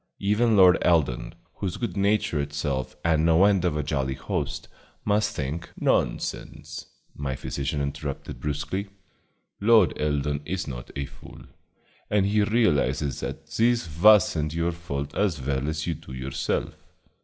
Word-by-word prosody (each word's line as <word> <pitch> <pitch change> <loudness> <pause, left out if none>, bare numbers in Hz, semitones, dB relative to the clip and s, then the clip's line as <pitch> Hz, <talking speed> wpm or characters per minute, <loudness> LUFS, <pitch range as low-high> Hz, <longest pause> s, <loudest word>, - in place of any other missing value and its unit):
Even 105 +2 +2
Lord 90 -2 +7
Eldon, 65 -8 +1 0.2
who's 95 -3 -3
good 110 -7 -3
nature 100 -5 +1
itself 70 -2 -3
and 80 -2 +3
no 85 +3 +5
end 100 -3 +3
of 85 -4 +1
a 75 - -1
jolly 70 -2 -1
host, 65 -1 -3 0.4
must 105 +1 +1
think 75 +4 -4
" - - -15
"Nonsense," 75 -1 -2 0.3
my 70 -2 -3
physician 70 +2 -3
interrupted 70 0 -5
brusquely, 75 +7 -3 0.7
"Lord 110 -3 +5
Eldon 75 -1 0
is 90 +4 -3
not - - -7
a 70 - -2
fool, - - -13 0.7
and 105 -2 +2
he 105 +2 +2
realizes 75 - +1
that 80 - -6
this 115 +6 +1
was 105 -2 +7
n't 75 0 -2
your 85 +1 +1
fault 75 -4 -5
as 95 -8 +1
well 70 +1 -2
as 75 0 -3
you 85 - -1
do 65 - -11
yourself. 65 +1 -2
75 Hz, 150 wpm, -26 LUFS, 70-100 Hz, 0.7 s, Lord